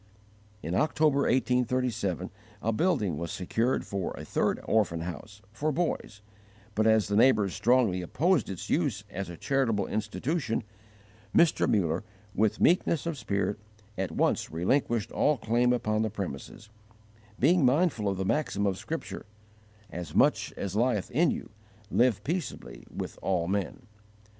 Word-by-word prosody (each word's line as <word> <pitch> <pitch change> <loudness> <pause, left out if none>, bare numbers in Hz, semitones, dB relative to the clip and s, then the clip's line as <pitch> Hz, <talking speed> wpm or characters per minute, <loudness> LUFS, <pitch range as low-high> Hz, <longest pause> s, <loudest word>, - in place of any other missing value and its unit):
In 80 - -3
October, 145 +3 +2
1837, 125 -7 0 0.3
a 115 - +1
building 110 - +1
was 85 -1 -4
secured 115 +7 -1
for 100 -3 -3
a - - -7
third - - 0
orphan 95 -7 +1
house, 100 +5 -8
for 150 +8 -1
boys; 145 -9 -2 0.5
but 110 +1 +2
as 110 -1 +4
the 100 - -1
neighbours 110 -4 +4
strongly 105 -3 +2
opposed 155 - +1
its 95 -3 -6
use 140 - 0
as 95 0 -4
a 85 - -8
charitable 130 - +1
institution, 115 - -2 0.7
Mr 170 -2 +4
Muller, 85 -3 +1 0.3
with 110 0 +1
meekness 170 -3 +3
of 165 -1 -2
spirit, 100 -5 -2 0.4
at 95 -1 -2
once - - +1
relinquished 110 - 0
all 150 -1 +2
claim 120 +2 +2
upon 110 -3 +1
the 110 - 0
premises, 100 +2 -7 0.7
being 165 +5 +4
mindful 130 - +2
of 95 - -2
the 95 - -2
maxim 120 -4 0
of 95 -2 0
Scripture: 165 -8 -6 0.6
"As 90 0 -6
much - - +3
as 100 -1 -4
lieth 115 -3 +1
in 155 +6 +3
you, - - -4 0.4
live 120 -5 +3
peaceably 170 +1 -4
with - - -6
all 90 -3 0
men." 100 +7 -2
110 Hz, 145 wpm, -28 LUFS, 95-135 Hz, 0.7 s, as